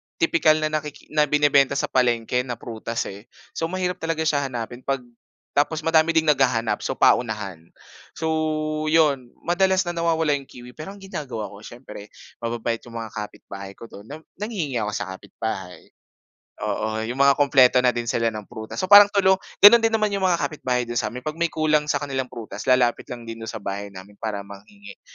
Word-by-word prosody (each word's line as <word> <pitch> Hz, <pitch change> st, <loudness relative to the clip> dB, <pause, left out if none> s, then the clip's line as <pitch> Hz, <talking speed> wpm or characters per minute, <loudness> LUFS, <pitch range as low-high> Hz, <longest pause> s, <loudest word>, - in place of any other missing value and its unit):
tipikal 165 Hz, -1 st, +3 dB
na 155 Hz, -, 0 dB
nakiki 150 Hz, -1 st, -5 dB
na 150 Hz, -1 st, +3 dB
binebenta 140 Hz, -2 st, +3 dB
sa -, -, -2 dB
palengke 120 Hz, -1 st, +1 dB
na 120 Hz, -, -3 dB
prutas, 115 Hz, 0 st, -4 dB
eh. 100 Hz, +4 st, -13 dB, 0.2 s
So 165 Hz, -, -2 dB
mahirap 180 Hz, 0 st, -2 dB
talaga 165 Hz, -1 st, -2 dB
siya 145 Hz, -3 st, +1 dB
hanapin 120 Hz, -1 st, -6 dB
pag 135 Hz, 0 st, -2 dB, 0.5 s
tapos 155 Hz, +2 st, 0 dB
madami 165 Hz, 0 st, +3 dB
ding 160 Hz, -, +4 dB
naghahanap 125 Hz, -5 st, +1 dB
so -, -, -3 dB
paunahan. 105 Hz, -7 st, +1 dB, 0.6 s
So 155 Hz, -1 st, -1 dB
'yon 145 Hz, -6 st, +2 dB
madalas 185 Hz, +2 st, +2 dB
na 175 Hz, -, -3 dB
nawawala 165 Hz, -2 st, +1 dB
'yong 140 Hz, -2 st, -2 dB
kiwi 125 Hz, 0 st, -12 dB
pero 155 Hz, +9 st, -9 dB
ang 200 Hz, -, -16 dB
ginagawa 135 Hz, -, -5 dB
ko 100 Hz, -, -12 dB
siyempre 110 Hz, -2 st, -11 dB, 0.3 s
mababait 115 Hz, -1 st, -2 dB
'yong 120 Hz, -1 st, -14 dB
mga 115 Hz, -2 st, -5 dB
kapitbahay 100 Hz, -2 st, -8 dB
ko -, -, -13 dB
do'n 105 Hz, -2 st, -12 dB
na 155 Hz, +4 st, -9 dB, 0.2 s
nanghihingi 185 Hz, -, -3 dB
ako 105 Hz, -1 st, -2 dB
sa 95 Hz, -2 st, -4 dB
kapit-bahay. 95 Hz, -2 st, -7 dB, 0.7 s
Oo, 110 Hz, 0 st, -2 dB
'yong 115 Hz, +3 st, -4 dB
mga 140 Hz, +1 st, +6 dB
kumpleto 135 Hz, -3 st, +5 dB
na 125 Hz, -1 st, +2 dB
din 120 Hz, -, -1 dB
sila 115 Hz, 0 st, 0 dB
ng 110 Hz, -2 st, -6 dB
prutas. 110 Hz, +2 st, -9 dB
So 185 Hz, +2 st, -2 dB
parang 205 Hz, 0 st, +11 dB
tulong 190 Hz, -2 st, +3 dB, 0.2 s
gano'n 230 Hz, +3 st, +11 dB
din 225 Hz, -, +3 dB
naman 215 Hz, -1 st, 0 dB
'yong 200 Hz, -, -1 dB
mga 185 Hz, -2 st, +3 dB
kapitbahay 125 Hz, -5 st, -1 dB
do'n 120 Hz, 0 st, -2 dB
sa -, -, -2 dB
amin. 125 Hz, +1 st, -9 dB
'Pag 155 Hz, +2 st, -5 dB
may 170 Hz, -, +2 dB
kulang 155 Hz, -2 st, +1 dB
sa 145 Hz, -, +1 dB
kanilang 135 Hz, -3 st, -3 dB
prutas 115 Hz, -4 st, -8 dB
lalapit 125 Hz, -2 st, +2 dB
lang 120 Hz, -1 st, -7 dB
din 115 Hz, 0 st, -8 dB
do'n 110 Hz, -, -7 dB
sa 110 Hz, -, -5 dB
bahay 100 Hz, -1 st, -5 dB
namin 100 Hz, +1 st, -13 dB
para 105 Hz, -2 st, -4 dB
manghingi. 100 Hz, -, -13 dB
130 Hz, 195 wpm, -23 LUFS, 115-160 Hz, 0.7 s, parang